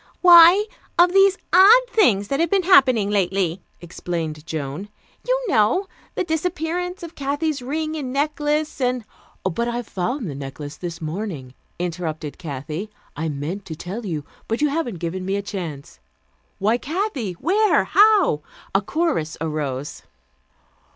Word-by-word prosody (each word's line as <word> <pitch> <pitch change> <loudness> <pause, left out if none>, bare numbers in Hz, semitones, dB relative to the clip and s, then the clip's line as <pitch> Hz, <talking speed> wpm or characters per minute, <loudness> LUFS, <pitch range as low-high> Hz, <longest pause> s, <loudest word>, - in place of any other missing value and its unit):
"Why, 350 +3 +8 0.3
of 350 +1 +5
these 390 0 +5 0.2
odd 410 +7 +8
things 215 - +2
that 275 - 0
have 335 0 +2
been 390 0 +2
happening 255 - +5
lately," 190 -3 0 0.2
explained 165 -3 -5
Joan. 155 +4 -5 0.4
"You - - +1
know, 250 - +2 0.3
the - - 0
disappearance 350 +2 -2
of 335 -1 -8
Kathy's 285 +1 -2
ring 310 +5 -3
and 275 -5 -4
necklace, 295 +1 -1
and 250 -2 0 0.2
" - - -33
"But 190 +6 -1
I 240 0 -2
found 225 +5 -3
the 150 - -5
necklace 140 +1 -7
this 170 +1 -7
morning," 155 -6 -5 0.2
interrupted 165 -4 -4
Kathy. 155 +5 -5 0.3
"I 160 +1 -2
meant 155 +8 -4
to 160 - -6
tell 190 +9 -6
you, 160 -8 -4 0.2
but 225 - -1
you 300 0 +2
haven't 280 - -2
given 175 +2 -4
me 195 +1 -1
a 200 - -2
chance." 170 -9 -7 0.6
"Why, 220 +5 +1
Kathy!" 300 - -3
"Where?" 410 - +2
"How?" 410 - +4 0.3
A 195 - +3
chorus 280 - -1
arose. 150 -4 -4
220 Hz, 145 wpm, -22 LUFS, -, 0.6 s, Why